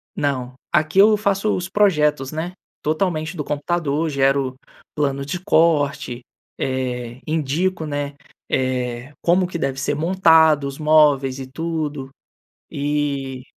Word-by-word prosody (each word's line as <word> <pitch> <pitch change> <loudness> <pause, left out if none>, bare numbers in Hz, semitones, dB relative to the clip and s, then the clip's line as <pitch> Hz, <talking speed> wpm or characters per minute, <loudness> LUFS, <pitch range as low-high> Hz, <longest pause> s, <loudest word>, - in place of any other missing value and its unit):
Não, 130 -3 -2 0.2
aqui 155 +2 +2
eu 215 +1 +7
faço 200 0 +1
os 180 +1 -4
projetos, 150 -9 +2
né, 160 +3 -4 0.3
totalmente 160 +1 -1
do 150 - -2
computador, 155 +1 -1
gero 135 -2 +1 0.4
planos 140 -2 -1
de 160 +6 -4
corte, 145 -8 +1 0.4
eh, 125 -2 -3
indico, 160 +3 -1
né, 145 -1 -3 0.3
eh, 130 0 -2
como 180 +1 +3
que 175 - -5
deve 135 -3 -2
ser 135 - -1
montado 160 -3 +4
os 140 - -7
móveis 150 -4 +3
e 130 - -6
tudo. 150 -2 -4 0.6
E 140 -3 -2
150 Hz, 125 wpm, -21 LUFS, 135-165 Hz, 0.6 s, eu